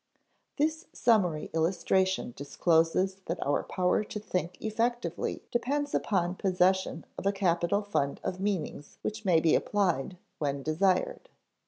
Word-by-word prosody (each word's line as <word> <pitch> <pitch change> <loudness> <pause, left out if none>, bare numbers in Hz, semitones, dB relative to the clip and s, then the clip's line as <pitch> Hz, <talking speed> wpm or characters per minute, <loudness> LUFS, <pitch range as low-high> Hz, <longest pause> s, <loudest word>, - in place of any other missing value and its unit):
This 315 +3 0
summary 190 -10 +2
illustration 185 -1 +1
discloses 165 +6 +2
that 170 - -2
our 145 - +2
power 180 +2 +1
to 210 - -6
think 180 -4 -3
effectively 230 +2 -2
depends 285 +4 -1
upon 180 -4 +1
possession 185 -2 +1
of 195 - -2
a - - +4
capital 190 0 +1
fund 140 -9 -1
of 185 - -3
meanings 185 -7 -3
which 215 0 -4
may 175 -4 +5
be 160 -1 +3
applied 180 -5 +1 0.2
when 140 -2 -1
desired. 185 - +1
185 Hz, 130 wpm, -29 LUFS, 165-205 Hz, 0.2 s, may